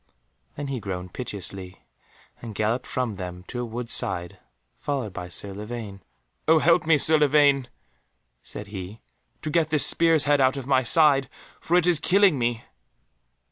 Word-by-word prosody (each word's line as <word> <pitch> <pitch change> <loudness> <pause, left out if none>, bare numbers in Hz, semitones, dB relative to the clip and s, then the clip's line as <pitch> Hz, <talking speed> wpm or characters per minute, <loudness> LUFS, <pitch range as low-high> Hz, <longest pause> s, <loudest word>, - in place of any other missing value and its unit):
Then 145 -1 -6
he 135 -2 -3
groaned 90 -3 -6
piteously, 95 -5 -7 0.6
and 115 -3 -8
galloped 110 +5 -1
from 125 -4 -2
them 90 -2 -8
to 120 - -5
a - - -3
wood's 120 +1 -3
side, 85 -1 -1 0.4
followed 130 -9 -3
by 90 -2 -7
Sir 100 +3 -5
Lavaine. 105 -1 -7 0.5
"Oh 160 +1 +6
help 165 +1 +3
me, 160 -2 +5
Sir 155 +2 +4
Lavaine," 145 -3 +3 0.7
said 105 - -9
he, 100 +1 -8 0.4
"to 155 - -3
get 160 -1 +1
this 150 -2 +3
spear's 165 -3 +4
head 145 -1 +2
out 130 +1 +2
of 135 - -6
my 135 -1 +2
side, 140 +1 +3 0.3
for 175 - +1
it 180 - +2
is 175 -4 +3
killing 190 -6 +3
me." 120 -1 -1
125 Hz, 165 wpm, -24 LUFS, 100-150 Hz, 0.7 s, Oh